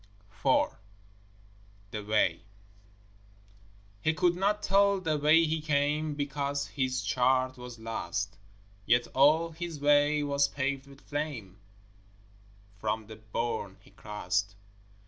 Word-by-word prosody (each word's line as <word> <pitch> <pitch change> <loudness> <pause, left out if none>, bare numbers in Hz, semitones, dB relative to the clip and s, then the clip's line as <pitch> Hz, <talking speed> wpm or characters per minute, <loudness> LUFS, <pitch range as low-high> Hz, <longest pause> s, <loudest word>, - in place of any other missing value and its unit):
IV - - +4 1.2
The 105 - -5
Way 105 +1 +2 1.6
He 160 +6 +1
could 175 +2 +2
not 205 +3 0
tell 200 0 +4
the 155 -4 -1
way 155 +3 +5
he 160 0 -1
came, 150 0 0
Because 140 0 -2
his 130 -2 -1
chart 130 +1 +2
was 125 -1 -9
lost: 110 -3 -4 0.5
Yet 120 +1 +4
all 155 +5 +4
his 165 -1 -6
way 145 +1 +4
was 140 -1 +2
paved 140 0 -2
with 140 0 -15
flame 145 -11 -5 1.2
From 110 +1 -2
the 110 +1 -10
bourne 110 -2 -3
he - - -20
crossed. 100 -1 -2
140 Hz, 115 wpm, -29 LUFS, 115-155 Hz, 1.6 s, way